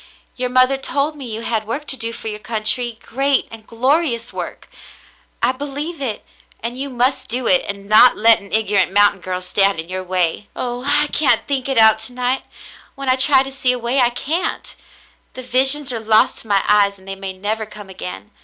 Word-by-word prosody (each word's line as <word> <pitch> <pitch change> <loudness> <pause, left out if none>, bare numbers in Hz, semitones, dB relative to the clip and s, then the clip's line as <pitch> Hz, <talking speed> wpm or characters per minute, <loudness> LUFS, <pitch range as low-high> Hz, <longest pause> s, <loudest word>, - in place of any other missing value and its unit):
Your 250 0 -2
mother 255 +2 +3
told 285 +3 -1
me 275 -4 -8
you 220 +1 -4
had 220 -2 -2
work 280 +6 -4
to 275 - +1
do 230 -2 -3
for 230 - -8
your 210 -1 -5
country, 225 +2 -1
great 275 +2 0
and 225 -1 -12
glorious 250 0 0
work. - - -7 0.8
I 240 - +4
believe 285 +4 -6
it, 230 -6 -4 0.3
and 235 +2 -5
you 275 +2 -5
must 255 +1 0
do 250 +2 -2
it 270 +2 +3
and 200 0 -7
not 215 +4 +6
let 225 +1 +5
an 200 - -15
ignorant 205 -3 +1
mountain 205 -1 +3
girl 185 0 -4
stand 195 -1 +1
in 165 +2 -6
your 185 0 -4
way. 185 +1 -1
*'0h! 245 +1 -4
I 295 +1 +6
can't 295 -1 +1
think 275 -2 -2
it 270 - -1
out 220 -1 +6
to 245 - -5
night. 250 +1 -1 0.5
When 275 -1 -4
I - - +3
try 265 0 +4
to 270 - -7
see 265 -1 +1
a - - -3
way, 245 +3 -1
I 240 - +4
can't. 305 +8 -3 0.6
The 255 - -7
visions 265 +2 +3
are 230 - -3
lost 220 0 +2
to - - -11
my 200 -2 +2
eyes, 200 -1 +3
and 190 0 -19
they 195 - -4
may 195 0 -6
never 210 +3 -3
come 210 -1 -11
again. 95 - -8
235 Hz, 210 wpm, -18 LUFS, 210-265 Hz, 0.8 s, not